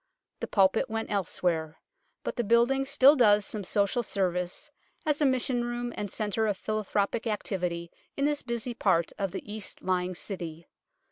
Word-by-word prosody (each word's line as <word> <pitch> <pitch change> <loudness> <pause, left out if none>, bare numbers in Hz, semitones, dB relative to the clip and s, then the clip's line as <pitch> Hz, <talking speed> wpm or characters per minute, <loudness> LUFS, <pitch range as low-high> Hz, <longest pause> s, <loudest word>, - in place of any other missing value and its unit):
The - - -3
pulpit 195 +5 +3
went 225 0 -3
elsewhere; 165 -5 -1 0.5
but - - -3
the 240 - 0
building 240 +5 +3
still 275 +2 +6
does 210 -6 +5
some 210 -2 -3
social 200 +6 +1
service, 180 -5 -2 0.3
as 300 -1 +1
a 290 - +5
mission 255 -1 +1
room 240 0 -3
and 205 -1 -4
centre 215 +2 -1
of 205 -2 0
philanthropic 215 +2 -1
activity 180 -5 -2 0.3
in 280 - +1
this 295 0 +1
busy 235 0 -2
part 185 -7 +2
of 195 -1 0
the - - -6
east 215 -2 -5
lying 185 -1 0
City. 170 -4 -5
210 Hz, 160 wpm, -28 LUFS, 185-240 Hz, 0.5 s, still